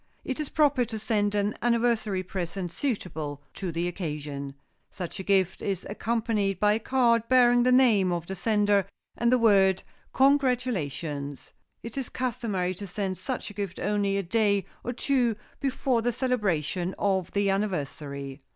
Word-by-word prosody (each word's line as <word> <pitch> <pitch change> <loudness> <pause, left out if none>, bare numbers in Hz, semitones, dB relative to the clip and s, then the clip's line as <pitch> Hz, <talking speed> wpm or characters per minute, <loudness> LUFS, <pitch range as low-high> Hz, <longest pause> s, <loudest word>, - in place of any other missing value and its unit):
It 265 - -3
is 300 - -2
proper 290 -4 +3
to 225 -1 -5
send 210 -1 0
an 205 +1 0
anniversary 230 -5 +1
present 180 -1 -4
suitable 160 - -3
to 185 -3 -4
the 170 +2 -1
occasion. 150 -5 -5 0.3
Such 180 +1 -6
a - - -4
gift 190 -1 +2
is 195 -3 -2
accompanied 215 -3 -1
by 210 0 +4
a 215 - 0
card 235 -2 +2
bearing 245 -1 +6
the 250 +1 +3
name 225 -8 +5
of 170 -1 -2
the 190 - -5
sender, 205 0 +2 0.3
and 235 +1 +2
the 255 - +5
word 195 -5 +4 0.3
"Congratulations." 215 - 0 0.3
It 230 +4 -5
is 260 - -4
customary 225 -8 -2
to 200 +2 -8
send 190 0 -3
such 255 -5 -4
a - - -12
gift 200 -3 -4
only 200 0 0
a 200 - -1
day 200 +1 +2 0.2
or 245 - -2
two 250 -2 +1 0.2
before 265 -3 0
the 245 +2 +1
celebration 195 - -1
of 190 -3 0
the 200 -1 +2
anniversary. 145 -8 -3
205 Hz, 160 wpm, -27 LUFS, 180-235 Hz, 0.3 s, bearing